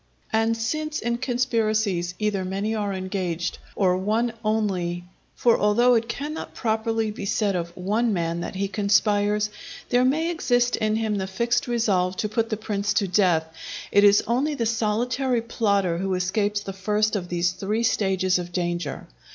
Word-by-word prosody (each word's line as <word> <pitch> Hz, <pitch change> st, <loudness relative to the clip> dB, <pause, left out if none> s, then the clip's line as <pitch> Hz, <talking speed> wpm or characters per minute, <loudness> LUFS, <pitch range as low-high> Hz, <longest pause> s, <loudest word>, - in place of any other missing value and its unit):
And 225 Hz, +1 st, +2 dB
since 305 Hz, +7 st, -2 dB
in 235 Hz, +1 st, -1 dB
conspiracies 220 Hz, -8 st, 0 dB
either 210 Hz, -3 st, -1 dB
many 195 Hz, +4 st, -2 dB
are 205 Hz, -2 st, -1 dB
engaged, 185 Hz, -2 st, -3 dB, 0.2 s
or 185 Hz, -3 st, +3 dB
one 220 Hz, +5 st, 0 dB
only 190 Hz, -5 st, -1 dB, 0.3 s
(for 235 Hz, -2 st, +3 dB
although 235 Hz, +5 st, +4 dB
it 230 Hz, 0 st, +1 dB
cannot 300 Hz, +5 st, -5 dB
properly 225 Hz, -1 st, 0 dB
be 210 Hz, -, -6 dB
said 200 Hz, -1 st, +1 dB
of 170 Hz, -1 st, -2 dB
one 215 Hz, +6 st, +1 dB
man 170 Hz, -3 st, -1 dB
that 175 Hz, -, -5 dB
he 195 Hz, +1 st, -1 dB
conspires, 205 Hz, +1 st, +2 dB, 0.4 s
there 245 Hz, 0 st, +3 dB
may 315 Hz, +6 st, +2 dB
exist 245 Hz, -7 st, +1 dB
in 215 Hz, -1 st, 0 dB
him 220 Hz, -2 st, 0 dB
the 190 Hz, -, -2 dB
fixed 235 Hz, +6 st, 0 dB
resolve 195 Hz, -6 st, +1 dB
to 215 Hz, -, 0 dB
put 225 Hz, +1 st, 0 dB
the 215 Hz, -, -1 dB
prince 210 Hz, -1 st, -2 dB
to 200 Hz, -2 st, +2 dB
death), 180 Hz, -4 st, +3 dB, 0.5 s
it 205 Hz, -, +5 dB
is 205 Hz, 0 st, +6 dB
only 270 Hz, +6 st, 0 dB
the 235 Hz, -4 st, -1 dB
solitary 235 Hz, +3 st, 0 dB
plotter 200 Hz, -7 st, +1 dB
who 190 Hz, 0 st, -1 dB
escapes 205 Hz, +3 st, 0 dB
the 195 Hz, -1 st, -6 dB
first 210 Hz, +3 st, 0 dB
of 180 Hz, -3 st, -3 dB
these 175 Hz, 0 st, +1 dB
three 205 Hz, +5 st, -2 dB
stages 190 Hz, -4 st, +1 dB
of 175 Hz, 0 st, -6 dB
danger. 175 Hz, -4 st, -3 dB
210 Hz, 170 wpm, -24 LUFS, 190-230 Hz, 0.5 s, is